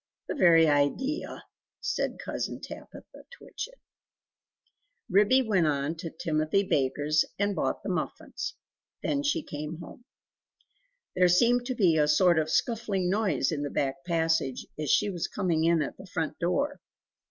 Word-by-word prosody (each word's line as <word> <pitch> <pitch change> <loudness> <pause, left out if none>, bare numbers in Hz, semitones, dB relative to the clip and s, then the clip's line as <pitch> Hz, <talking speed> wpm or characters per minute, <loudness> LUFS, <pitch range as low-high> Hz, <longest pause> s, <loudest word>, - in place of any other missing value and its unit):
The - - -2
very 170 - +6
idea!" 150 - 0 0.4
said - - -2
Cousin - - -4
Tabitha - - -11
Twitchit. - - -8 1.3
Ribby 210 +7 +5
went 195 -8 +2
on 145 +1 0
to 165 +1 -5
Timothy 160 +3 0
Baker's 145 -1 +1
and 200 0 0
bought - - -1
the - - -4
muffins. - - -4 0.5
Then 285 - 0
she 290 +2 0
went 150 +2 -5
home. 210 +8 -11 1.1
There 180 0 +5
seemed 240 +7 +3
to 255 - -2
be 180 -8 +3
a 150 - +3
sort 170 +2 +4
of 155 0 -1
scuffling 205 -4 0
noise 190 - +1
in 150 -3 -2
the 145 - -2
back 135 -1 -2
passage, 165 -6 0
as 150 -2 -2
she 205 +7 +3
was 175 -3 -3
coming 170 -5 0
in 165 -2 +3
at - - -6
the 190 - -12
front 165 -3 -3
door. 280 +12 -1
170 Hz, 150 wpm, -28 LUFS, 155-210 Hz, 1.3 s, very